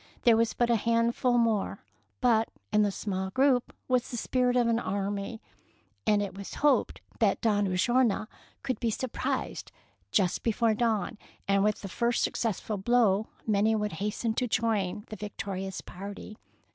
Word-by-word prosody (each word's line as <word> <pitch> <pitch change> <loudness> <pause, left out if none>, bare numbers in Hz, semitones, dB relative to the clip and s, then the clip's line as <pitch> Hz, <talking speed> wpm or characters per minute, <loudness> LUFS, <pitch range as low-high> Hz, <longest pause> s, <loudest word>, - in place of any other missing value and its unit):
There 235 -2 +6
was 230 0 +1
but 240 -1 +2
a 235 - +4
handful 230 +2 +2
more; 225 -4 0 0.4
but 225 -3 +3 0.2
in 210 - +5
the 205 - +3
small 190 -1 -3
group 260 +3 +2 0.2
was 250 -1 +1
the 240 - -4
spirit 250 +1 +1
of 245 -1 +4
an 230 0 +2
army, 200 +2 -3 0.6
and 210 -1 +4
it 195 -2 -6
was 200 0 -7
hoped 295 - +2 0.2
that - - +3
Don 205 -3 +2
Ulloa 215 +4 +2 0.4
could 260 -2 -2
be 235 - 0
surprised 245 +3 -3 0.4
just 185 -4 +2
before 230 0 +2
dawn, 220 -1 0 0.3
and 195 0 +3
with 210 0 0
the - - -4
first 235 +5 0
successful 220 -1 -1
blow 215 -1 +3 0.2
many 215 +1 +3
would 210 -1 -1
hasten 220 +2 -1
to 250 +2 0
join 215 -4 0
the 215 - -6
victorious 195 -2 -5
party. 200 +3 -8
220 Hz, 160 wpm, -29 LUFS, 200-235 Hz, 0.6 s, There